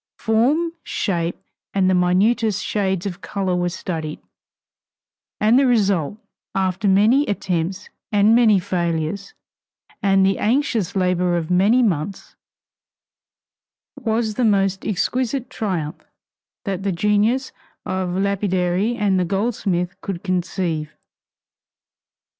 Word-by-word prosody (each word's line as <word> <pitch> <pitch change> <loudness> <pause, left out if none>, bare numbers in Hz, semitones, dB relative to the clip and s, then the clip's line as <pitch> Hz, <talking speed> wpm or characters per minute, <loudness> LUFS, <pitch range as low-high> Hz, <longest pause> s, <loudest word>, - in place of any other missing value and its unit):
Form, 270 +10 +1
shape, 170 -4 -2 0.4
and 190 -2 +3
the 185 - +3
minutest 200 +4 +2
shades 190 -3 -1
of 190 -1 -5
color 190 -3 -2
were 175 0 0
studied, 160 -3 -5 1.2
and 220 +4 +4
the 275 - +3
result, 200 - +1 0.4
after 190 +1 0
many 215 +8 +4
attempts 185 -2 -2 0.2
and 205 +1 +4
many 230 -3 +5
failures, 175 +2 -2 0.7
and 195 -1 +4
the 195 0 +1
anxious 225 - 0
labor 180 -2 +1
of 165 0 -3
many 205 +8 +4
months, 185 -3 -2 1.6
was 225 -4 -1
the 250 - -1
most 195 -3 +1
exquisite 250 +5 -1
triumph 175 -7 -3 0.6
that 195 -2 -2
the 200 0 -1
genius 210 +7 +1 0.3
of 185 -1 -2
the - - -1
lapidary 195 +1 0
and 200 -5 +1
the - - +2
goldsmith 190 -2 -1
could 185 -3 -5
conceive. 175 -4 -2
195 Hz, 115 wpm, -21 LUFS, 180-215 Hz, 1.6 s, many